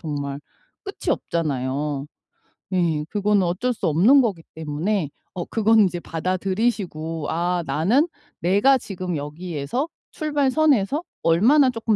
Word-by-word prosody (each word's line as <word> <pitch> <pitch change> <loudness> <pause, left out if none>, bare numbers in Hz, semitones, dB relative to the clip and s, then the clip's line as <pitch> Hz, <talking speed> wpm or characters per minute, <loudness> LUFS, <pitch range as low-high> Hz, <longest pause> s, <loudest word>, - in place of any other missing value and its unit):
정말 145 -3 -4 0.4
끝이 395 - -4
없잖아요. 145 -2 -2 0.7
예. 165 -4 +1
그거는 205 -1 +2
어쩔 180 +9 0
수 - - -5
없는 210 - +6
거기 200 -9 -1
때문에 160 +2 -1 0.2
어 175 - -4
그건 225 0 +3
인제 180 -3 +1
받아들이시고 185 -2 -2
'아 175 +2 0
나는 230 - +2 0.3
내가 205 +10 +4
지금 185 -5 -5
여기에서 155 - -3 0.2
출발선에서 290 - +1 0.2
얼마나 245 - +5
쪼끔 230 -2 0
185 Hz, 270 characters per minute, -23 LUFS, 160-230 Hz, 0.7 s, 없는